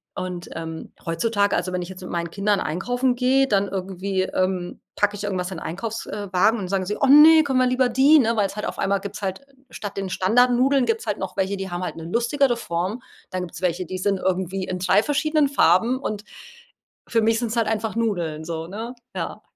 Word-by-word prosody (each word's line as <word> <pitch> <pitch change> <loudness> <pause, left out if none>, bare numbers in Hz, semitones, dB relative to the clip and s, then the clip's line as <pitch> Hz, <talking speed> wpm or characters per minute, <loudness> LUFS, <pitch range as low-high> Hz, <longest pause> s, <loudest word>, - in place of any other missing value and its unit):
Und, 180 -1 -5
ähm, 160 0 -7
heutzutage 200 +5 +1
also, 185 - -1
wenn 180 -1 -2
ich 175 - -9
jetzt 190 0 -10
mit 180 - -8
meinen 170 -1 -3
Kindern 200 +1 +1
einkaufen 245 +10 0
gehe, 260 +2 +3
dann 200 -4 +2
irgendwie, 190 0 -2
ähm, 185 -1 -2
packe 205 0 +1
ich 205 - -7
irgendwas 185 -2 -2
in 180 - -5
Einkaufs 220 +8 -5
äh, 205 -1 -5
Wagen 210 +5 +4
und 190 -4 -5
sagen 190 -1 -1
sie: 210 - -2
„Oh 275 - +3
ne, 310 +3 +8
können 265 -3 +1
wir 255 - +4
lieber 255 0 +2
die? 270 +6 +5
Ne? 230 -5 +3
Weil 205 -3 +2
es 195 - -10
halt 210 - -4
auf - - -5
einmal 195 0 +1
gibt's 200 +1 -7
halt 190 +2 -3 0.3
statt 205 -5 -7
den 195 -1 -3
Standardnudeln 245 +7 +3
gibt's 455 +1 -1
halt - - -2
noch - - -5
welche, 195 +1 0
die 195 -1 -5
haben 175 +1 -4
halt 180 - -5
'ne 165 - -7
lustigere 240 - +1
Form. 185 +5 -3 0.3
Da 185 - -3
gibt's 180 0 -7
welche, 180 0 0
die 185 +2 -5
sind 195 0 +1
irgendwie 190 0 -1
in 185 0 -4
3 185 +3 +3
verschiedenen 300 0 +1
Farben 240 +1 +3
und 210 -6 -4 0.8
für 230 - +2
mich 225 +1 +2
sind's 235 -1 -2
halt 230 -2 +2
einfach 220 0 -2
Nudeln 175 -9 -1
so, 165 -1 -4
ne, 225 +7 -6 0.2
ja. - - -4
200 Hz, 220 wpm, -23 LUFS, 185-240 Hz, 0.8 s, ne